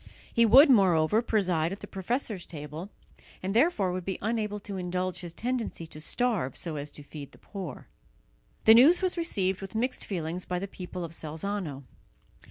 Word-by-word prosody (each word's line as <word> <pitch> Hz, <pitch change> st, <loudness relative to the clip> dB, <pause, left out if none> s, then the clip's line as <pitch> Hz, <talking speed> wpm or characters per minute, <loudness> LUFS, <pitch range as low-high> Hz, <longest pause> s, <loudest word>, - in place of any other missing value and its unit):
He 235 Hz, 0 st, +5 dB
would, 265 Hz, +8 st, +9 dB
moreover, 195 Hz, -, +4 dB
preside 180 Hz, -8 st, +1 dB
at 195 Hz, -, -6 dB
the -, -, -6 dB
professors' 205 Hz, 0 st, -3 dB
table, 155 Hz, +4 st, -7 dB, 0.5 s
and 190 Hz, +1 st, -1 dB
therefore 230 Hz, -, +3 dB
would 180 Hz, 0 st, -3 dB
be 190 Hz, +1 st, -3 dB
unable 215 Hz, -1 st, -1 dB
to 200 Hz, -1 st, -6 dB
indulge 180 Hz, 0 st, -2 dB
his 175 Hz, -2 st, -6 dB
tendency 235 Hz, -4 st, -3 dB
to 155 Hz, -1 st, -10 dB
starve 210 Hz, -, 0 dB
so 165 Hz, -3 st, -3 dB
as 145 Hz, 0 st, -4 dB
to 145 Hz, -, -10 dB
feed 145 Hz, -1 st, -10 dB
the -, -, -15 dB
poor. 195 Hz, -3 st, -8 dB, 0.8 s
The 220 Hz, -, +9 dB
news 295 Hz, +11 st, +7 dB
was 370 Hz, -, +1 dB
received 200 Hz, -, 0 dB
with 195 Hz, +2 st, -8 dB
mixed 245 Hz, +4 st, -1 dB
feelings 175 Hz, -1 st, -3 dB
by 180 Hz, -, -3 dB
the 195 Hz, +2 st, -3 dB
people 180 Hz, -1 st, -7 dB
of 165 Hz, -, -6 dB
Salzano. 160 Hz, -2 st, -4 dB
190 Hz, 180 wpm, -28 LUFS, 170-220 Hz, 0.8 s, would